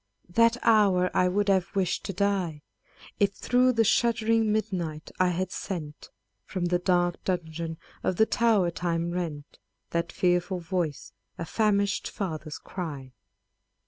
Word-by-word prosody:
that 230 Hz, +5 st, +4 dB
hour 200 Hz, -5 st, +4 dB
I 180 Hz, -, +3 dB
would 200 Hz, +3 st, +1 dB
have 195 Hz, -1 st, +1 dB
wish'd 190 Hz, -3 st, 0 dB
to -, -, -2 dB
die, 185 Hz, -6 st, -1 dB, 0.6 s
If 200 Hz, -1 st, +3 dB
through 250 Hz, +5 st, +2 dB
the 225 Hz, -1 st, +3 dB
shuddering 225 Hz, 0 st, +2 dB
miduight 180 Hz, -8 st, -2 dB
I 185 Hz, -, +4 dB
had 180 Hz, +1 st, -1 dB
sent, 155 Hz, -7 st, -6 dB, 0.3 s
From 185 Hz, -3 st, -3 dB
the 175 Hz, 0 st, +1 dB
dark 175 Hz, -1 st, +1 dB
dungeon 165 Hz, -2 st, -3 dB, 0.2 s
of 185 Hz, -, 0 dB
the 220 Hz, -, +4 dB
tow'r 220 Hz, -7 st, +2 dB
time 170 Hz, 0 st, -1 dB
rent, 160 Hz, -5 st, -5 dB, 0.3 s
That 170 Hz, 0 st, -1 dB
fearful 180 Hz, +1 st, +1 dB
voice, 170 Hz, -4 st, -3 dB, 0.2 s
a 165 Hz, -, -4 dB
famish'd 200 Hz, +1 st, +1 dB
father's 155 Hz, -6 st, -5 dB
cry 145 Hz, -8 st, -7 dB
180 Hz, 140 wpm, -27 LUFS, 170-200 Hz, 0.6 s, that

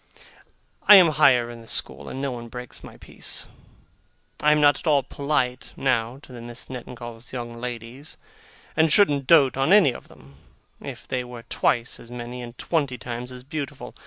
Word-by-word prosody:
I 210 Hz, -, +11 dB
am 180 Hz, -4 st, +8 dB
higher 125 Hz, -5 st, +4 dB
in 120 Hz, -1 st, -10 dB
the 115 Hz, -, -15 dB
school, 70 Hz, -6 st, -4 dB
and 130 Hz, -, -6 dB
no 140 Hz, -1 st, -2 dB
one 120 Hz, -1 st, -7 dB
breaks 125 Hz, +1 st, -8 dB
my -, -, -11 dB
peace. -, -, -4 dB, 1.0 s
I 150 Hz, -, +5 dB
am 150 Hz, -, +4 dB
not 145 Hz, -2 st, +5 dB
at -, -, -8 dB
all 145 Hz, -3 st, +4 dB
polite, 130 Hz, -2 st, -2 dB
now, 125 Hz, -2 st, 0 dB
to 130 Hz, -, -13 dB
the 120 Hz, -, -9 dB
Misses 120 Hz, +2 st, -7 dB
Nettingalls' 120 Hz, -2 st, -8 dB
young 120 Hz, -2 st, -5 dB
ladies, 125 Hz, +4 st, -7 dB, 0.6 s
and 160 Hz, -1 st, +3 dB
shouldn't 145 Hz, -8 st, +4 dB
dote 140 Hz, -6 st, +5 dB
on 135 Hz, +6 st, +2 dB
any 195 Hz, -11 st, +6 dB
of -, -, -11 dB
them, 70 Hz, +1 st, -18 dB, 0.4 s
if -, -, -8 dB
they 130 Hz, -1 st, -2 dB
were 120 Hz, -1 st, -10 dB
twice 115 Hz, +1 st, -1 dB
as 115 Hz, -, -13 dB
many 120 Hz, 0 st, -7 dB
and 120 Hz, 0 st, -9 dB
twenty 140 Hz, -7 st, -1 dB
times 120 Hz, +2 st, -6 dB
as 125 Hz, 0 st, -8 dB
beautiful. 140 Hz, -3 st, -6 dB
125 Hz, 185 wpm, -24 LUFS, 120-140 Hz, 1.0 s, I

